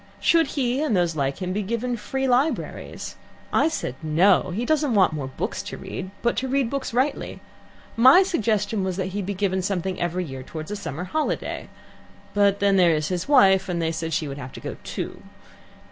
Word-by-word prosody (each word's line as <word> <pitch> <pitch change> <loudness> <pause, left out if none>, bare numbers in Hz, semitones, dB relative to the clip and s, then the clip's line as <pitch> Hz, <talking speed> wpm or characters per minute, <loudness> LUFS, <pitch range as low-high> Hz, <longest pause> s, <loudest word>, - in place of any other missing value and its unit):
Should 330 -2 +4
he 255 0 +1
and 275 -10 +1
those 170 -2 +1
like 140 +4 -1
him 180 0 -2
be 210 - -1
given 235 +4 -2
free 265 +5 -2
libraries? 260 +5 -1 0.4
I - - +4
said 315 - -3
'No!' 170 +6 +3
He 210 +7 -2
doesn't 295 -4 +1
want 190 -5 +4
more 145 -4 -3
books 135 - -4
to - - -7
read, 185 0 -6
but 235 - +2
to 265 - -1
read 265 -2 0
books 275 -1 -3
rightly. 260 +5 -1 0.6
My 260 +11 +8
suggestion 215 - 0
was 185 -1 -2
he 190 -1 -2
should 200 0 -3
be 200 - -2
given 190 -1 0
something 185 -1 -2
every 175 +1 -1
year 135 -3 -7
towards 155 +6 -7
a - - -2
summer 180 -5 -5
holiday, 310 +11 -2 0.6
but 200 -1 +3
then 200 -1 +3
there 175 -3 +5
is 155 -1 -1
his 180 -2 -2
wife, 195 -9 +5
and 175 -1 -1
they 165 -1 0
said 165 0 -4
she 155 -1 -1
would 140 0 -6
have 125 -1 -8
to - - -8
go - - -6
too. - - -5
195 Hz, 205 wpm, -24 LUFS, 175-245 Hz, 0.6 s, My